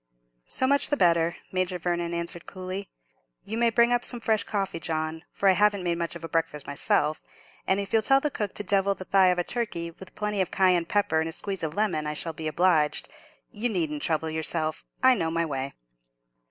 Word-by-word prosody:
"So -, -, +3 dB
much 280 Hz, +2 st, +2 dB
the 290 Hz, -, +1 dB
better," 170 Hz, -1 st, +3 dB, 0.2 s
Major 185 Hz, -1 st, -1 dB
Vernon 175 Hz, 0 st, -2 dB
answered, 170 Hz, 0 st, -4 dB
coolly. 185 Hz, +1 st, -6 dB, 0.6 s
"You 220 Hz, -, -4 dB
may 235 Hz, 0 st, +3 dB
bring 235 Hz, +1 st, +4 dB
up 245 Hz, 0 st, +1 dB
some 240 Hz, -, +1 dB
fresh 220 Hz, -2 st, +1 dB
coffee, 195 Hz, -5 st, -2 dB
John; 160 Hz, 0 st, -2 dB
for 200 Hz, -, 0 dB
I -, -, +8 dB
haven't 205 Hz, 0 st, +3 dB
made 170 Hz, -1 st, -1 dB
much 170 Hz, 0 st, -2 dB
of 170 Hz, -, -9 dB
a -, -, -4 dB
breakfast 155 Hz, -3 st, -2 dB
myself; 150 Hz, +2 st, 0 dB, 0.5 s
and 190 Hz, +1 st, +3 dB
if 200 Hz, -1 st, -5 dB
you'll 225 Hz, -, +5 dB
tell 270 Hz, +5 st, +4 dB
the 295 Hz, +1 st, -2 dB
cook 210 Hz, -6 st, -3 dB
to 205 Hz, -, -4 dB
devil 200 Hz, 0 st, +2 dB
the 185 Hz, -, -8 dB
thigh 190 Hz, -1 st, +4 dB
of 180 Hz, -1 st, +3 dB
a 175 Hz, -, +1 dB
turkey, 170 Hz, -7 st, -3 dB
with 185 Hz, +3 st, -13 dB
plenty 210 Hz, -2 st, -1 dB
of 185 Hz, -, -1 dB
cayenne 185 Hz, -3 st, +3 dB
pepper 200 Hz, -3 st, +1 dB
and 160 Hz, +1 st, -1 dB
a -, -, -5 dB
squeeze 195 Hz, +3 st, -2 dB
of 160 Hz, 0 st, -3 dB
lemon, 190 Hz, -8 st, 0 dB
I 150 Hz, -, -3 dB
shall 165 Hz, +1 st, -3 dB
be 160 Hz, 0 st, -5 dB
obliged. 155 Hz, -1 st, +2 dB, 0.4 s
You 230 Hz, +4 st, -2 dB
needn't 160 Hz, -7 st, -1 dB
trouble 160 Hz, 0 st, 0 dB
yourself; 160 Hz, 0 st, -2 dB, 0.2 s
I 260 Hz, 0 st, +7 dB
know 165 Hz, -9 st, -1 dB
my 165 Hz, +1 st, 0 dB
way." 135 Hz, -3 st, -4 dB
180 Hz, 220 wpm, -27 LUFS, 160-205 Hz, 0.6 s, I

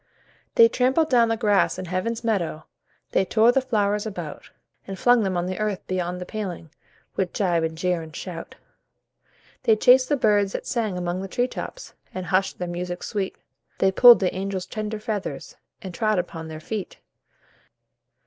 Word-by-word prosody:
They 230 Hz, -, +8 dB
trampled 260 Hz, +7 st, +1 dB
down 235 Hz, -2 st, +5 dB
the 225 Hz, 0 st, 0 dB
grass 205 Hz, -5 st, +2 dB
in 185 Hz, -, -5 dB
Heaven's 190 Hz, +7 st, -2 dB
Meadow, 190 Hz, -9 st, -1 dB, 0.5 s
They -, -, +3 dB
tore 220 Hz, +4 st, +4 dB
the 270 Hz, -, +2 dB
flowers 210 Hz, -4 st, 0 dB
about, 175 Hz, -8 st, -7 dB, 0.4 s
And 195 Hz, -1 st, -6 dB
flung 245 Hz, +3 st, +4 dB
them 190 Hz, -3 st, -1 dB
on 175 Hz, -, -1 dB
the 185 Hz, +2 st, -4 dB
earth 210 Hz, -3 st, -2 dB
beyond 180 Hz, -1 st, -2 dB
the 180 Hz, -, -6 dB
paling, 180 Hz, -7 st, -6 dB, 0.4 s
With 185 Hz, -2 st, -1 dB
gibe, 175 Hz, -5 st, +1 dB
and 160 Hz, 0 st, -3 dB
jeer, 180 Hz, 0 st, 0 dB
and 160 Hz, -1 st, -11 dB
shout. 170 Hz, -3 st, -7 dB, 1.1 s
They 220 Hz, -, +4 dB
chased 255 Hz, +4 st, +5 dB
the 290 Hz, -, +2 dB
birds 205 Hz, -5 st, +2 dB
that -, -, -4 dB
sang 220 Hz, -7 st, -1 dB
among 175 Hz, +1 st, -2 dB
the 195 Hz, -, -5 dB
tree 245 Hz, +6 st, 0 dB
tops -, -, -8 dB, 0.2 s
And 185 Hz, -1 st, -4 dB
hushed 185 Hz, +3 st, 0 dB
their 180 Hz, -, -4 dB
music 175 Hz, +1 st, -5 dB
sweet, 200 Hz, -3 st, -3 dB, 0.4 s
They 190 Hz, -, +3 dB
pulled 240 Hz, +4 st, +8 dB
the -, -, +2 dB
little 185 Hz, +1 st, -1 dB
angels' 190 Hz, -1 st, -3 dB
tender 215 Hz, +1 st, -4 dB
feathers 210 Hz, -2 st, -5 dB, 0.3 s
And 185 Hz, -2 st, -7 dB
trod 215 Hz, +2 st, +1 dB
upon 165 Hz, -2 st, -4 dB
their 155 Hz, -1 st, -7 dB
feet. 205 Hz, +4 st, -5 dB
195 Hz, 180 wpm, -24 LUFS, 180-220 Hz, 1.1 s, They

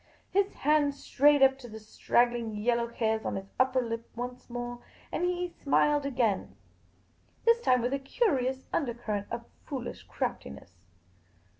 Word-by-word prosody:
His 395 Hz, +1 st, +2 dB
hand 295 Hz, -1 st, +2 dB
strayed 285 Hz, 0 st, +4 dB
up 265 Hz, 0 st, +5 dB
to 245 Hz, -, -10 dB
the 220 Hz, -, -8 dB
straggling 235 Hz, +1 st, +1 dB
yellow 235 Hz, +2 st, +1 dB
hairs 220 Hz, -1 st, -1 dB
on -, -, -2 dB
his 195 Hz, 0 st, -6 dB
upper 255 Hz, 0 st, +3 dB
lip 230 Hz, 0 st, -5 dB
once 245 Hz, +1 st, -6 dB
more, 240 Hz, 0 st, -5 dB, 0.3 s
and -, -, -2 dB
he 360 Hz, 0 st, 0 dB
smiled 290 Hz, 0 st, +3 dB
again, 240 Hz, -7 st, 0 dB, 0.9 s
this 465 Hz, 0 st, +5 dB
time 255 Hz, -, +3 dB
with 245 Hz, +2 st, 0 dB
a 275 Hz, -, 0 dB
curious 265 Hz, -, 0 dB
undercurrent 230 Hz, -7 st, -2 dB
of 235 Hz, 0 st, -5 dB, 0.2 s
foolish 255 Hz, -4 st, -5 dB
craftiness. 70 Hz, +5 st, -4 dB
245 Hz, 145 wpm, -29 LUFS, 230-280 Hz, 0.9 s, up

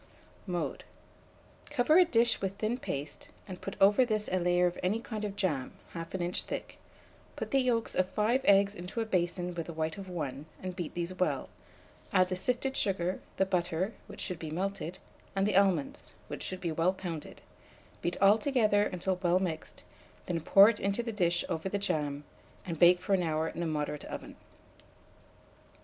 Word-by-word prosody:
Mode. 175 Hz, -2 st, -2 dB, 0.9 s
Cover 305 Hz, +8 st, +4 dB
a 365 Hz, -, +7 dB
dish 235 Hz, -7 st, +2 dB
with 195 Hz, 0 st, -2 dB
thin 225 Hz, +4 st, -1 dB
paste, 145 Hz, -, -5 dB, 0.2 s
and 185 Hz, -2 st, -8 dB
put 195 Hz, -, -5 dB
over 205 Hz, +6 st, +6 dB
this 215 Hz, -3 st, 0 dB
a 185 Hz, -, +2 dB
layer 175 Hz, 0 st, +3 dB
of 175 Hz, 0 st, -1 dB
any 195 Hz, +5 st, +1 dB
kind 220 Hz, -2 st, -5 dB
of 205 Hz, -1 st, -3 dB
jam, 150 Hz, -10 st, -1 dB, 0.2 s
1/2 165 Hz, +2 st, -5 dB
inch 175 Hz, +1 st, 0 dB
thick; -, -, -6 dB, 0.6 s
put -, -, -5 dB
the 275 Hz, -, +4 dB
yolks 245 Hz, -3 st, +1 dB
of 185 Hz, 0 st, +1 dB
5 225 Hz, +7 st, +2 dB
eggs 200 Hz, 0 st, +5 dB
into 185 Hz, +4 st, -5 dB
a -, -, -1 dB
basin 180 Hz, -2 st, -1 dB
with 165 Hz, -2 st, -4 dB
the 170 Hz, -, -6 dB
white 160 Hz, +4 st, -2 dB
of 190 Hz, -1 st, -8 dB
1, 150 Hz, -4 st, -4 dB, 0.2 s
and 185 Hz, -1 st, -4 dB
beat 175 Hz, -3 st, -5 dB
these 175 Hz, +1 st, -2 dB
well; 185 Hz, 0 st, -1 dB, 0.6 s
add 185 Hz, -1 st, +4 dB
the 185 Hz, -, -1 dB
sifted 250 Hz, +7 st, -1 dB
sugar, 185 Hz, -2 st, 0 dB, 0.2 s
the 190 Hz, -, +3 dB
butter, 180 Hz, +2 st, -1 dB
which -, -, -8 dB
should 180 Hz, -4 st, -3 dB
be 160 Hz, -, -5 dB
melted, 185 Hz, +1 st, -3 dB, 0.4 s
and 195 Hz, 0 st, +2 dB
the 205 Hz, -, +1 dB
almonds, 190 Hz, -7 st, +2 dB, 0.2 s
which -, -, -5 dB
should 185 Hz, -1 st, -4 dB
be 170 Hz, -, -1 dB
well 165 Hz, +4 st, +2 dB
pounded; 170 Hz, -5 st, -7 dB, 0.6 s
beat 175 Hz, -, -2 dB
all 200 Hz, +3 st, +6 dB
together 215 Hz, -5 st, +3 dB
until 185 Hz, +1 st, -2 dB
well 175 Hz, -1 st, +3 dB
mixed, 170 Hz, -4 st, -4 dB, 0.4 s
then 170 Hz, -2 st, -2 dB
pour 195 Hz, +5 st, +8 dB
it 225 Hz, -2 st, +1 dB
into 200 Hz, +4 st, 0 dB
the 230 Hz, -, -3 dB
dish 175 Hz, -4 st, +1 dB
over 170 Hz, +1 st, -2 dB
the 200 Hz, -, -1 dB
jam, 150 Hz, -7 st, -1 dB, 0.4 s
and 165 Hz, -4 st, -4 dB
bake 175 Hz, +1 st, +7 dB
for 195 Hz, -, -1 dB
an 190 Hz, -, +3 dB
hour 160 Hz, -1 st, 0 dB
in -, -, -6 dB
a 170 Hz, -, 0 dB
moderate 150 Hz, -1 st, -2 dB
oven. -, -, -7 dB
185 Hz, 190 wpm, -31 LUFS, 170-205 Hz, 0.9 s, pour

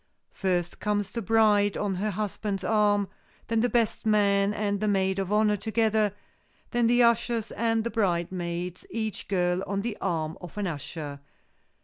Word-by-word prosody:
First, 180 Hz, -3 st, -1 dB
comes 205 Hz, -2 st, -1 dB
the 230 Hz, -, -3 dB
bride 210 Hz, -1 st, +3 dB
on 205 Hz, -2 st, -1 dB
her 200 Hz, +4 st, -1 dB
husband's 205 Hz, -1 st, -3 dB
arm, 205 Hz, -1 st, +2 dB, 0.4 s
then 225 Hz, 0 st, +2 dB
the 245 Hz, +2 st, +2 dB
best 235 Hz, -3 st, +1 dB
man 200 Hz, -2 st, +3 dB
and 205 Hz, -1 st, -1 dB
the 215 Hz, -, 0 dB
maid 190 Hz, -1 st, +1 dB
of 195 Hz, 0 st, -2 dB
honor 210 Hz, 0 st, +3 dB
together, 220 Hz, -1 st, +1 dB, 0.6 s
then 240 Hz, -2 st, +2 dB
the 245 Hz, +1 st, +5 dB
ushers 235 Hz, -1 st, +2 dB
and 225 Hz, -1 st, 0 dB
the 235 Hz, -, -3 dB
bridesmaids, 175 Hz, -2 st, -1 dB
each 220 Hz, -2 st, -4 dB
girl 180 Hz, -1 st, +1 dB
on 200 Hz, 0 st, -1 dB
the 225 Hz, 0 st, -3 dB
arm 165 Hz, -2 st, -2 dB
of 180 Hz, +2 st, -10 dB
an 205 Hz, -, -1 dB
usher. 150 Hz, -3 st, -5 dB
205 Hz, 160 wpm, -27 LUFS, 185-220 Hz, 0.6 s, the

